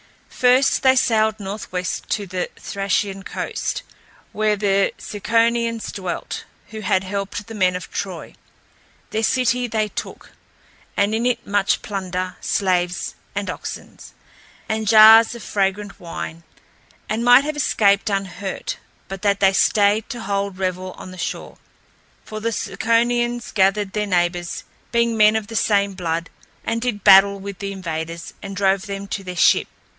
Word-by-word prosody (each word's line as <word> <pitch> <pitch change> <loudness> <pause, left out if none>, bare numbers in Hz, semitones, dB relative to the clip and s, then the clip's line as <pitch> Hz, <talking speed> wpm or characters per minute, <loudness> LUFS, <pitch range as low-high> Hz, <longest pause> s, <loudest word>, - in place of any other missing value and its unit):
First 255 +2 +3
they 260 -1 +5
sailed 220 -3 +2
northwest 190 -2 -4
to 205 - -1
the 185 -1 -3
Thracian 195 0 -2
coast, - - -4 0.5
where 215 0 +1
the 200 -1 +2
Ciconians 230 +2 0
dwelt, 185 -3 -5 0.2
who 220 - -7
had 190 -2 +1
helped 200 +1 -4
the 225 - -9
men 185 -4 +2
of 180 - -7
Troy. 185 -4 -5 0.8
Their 220 - -1
city 250 +1 +1
they 215 -2 -1
took, - - -7 0.7
and 200 +2 +2
in 230 +2 +1
it 240 -1 -1
much 200 -1 +1
plunder, 185 -4 -4
slaves 180 -2 0 0.2
and - - -2
oxen, - - -8 0.7
and 220 0 -2
jars 220 +2 +8
of 235 - -9
fragrant 200 0 -1
wine, 165 -2 -6 0.7
and 220 +3 -1
might 245 +2 +7
have 305 +1 -3
escaped 200 -8 +2
unhurt, 195 - -3 0.3
but 195 -1 -7
that 200 -1 +2
they 195 -1 +5
stayed 205 +3 +3
to 245 -3 -5
hold 200 -1 -2
revel 185 0 -3
on 185 - -10
the 185 - -11
shore. - - -5 0.7
For 215 - -6
the 230 +2 -1
Ciconians 240 +1 0
gathered 195 0 +2
their 210 -1 -1
neighbors, 175 -2 -1 0.3
being 235 -1 +2
men 215 0 +5
of 220 -1 -1
the 225 - -9
same 200 -2 +2
blood, 170 -2 -3 0.3
and 230 0 -1
did 225 -5 -2
battle 200 +1 +7
with 195 -1 -7
the 200 0 -4
invaders 165 -3 -5
and 195 0 -7
drove 195 +1 +1
them 200 0 -5
to 195 - -4
their 180 -1 -6
ship. 165 - +4
200 Hz, 150 wpm, -21 LUFS, 190-225 Hz, 0.8 s, jars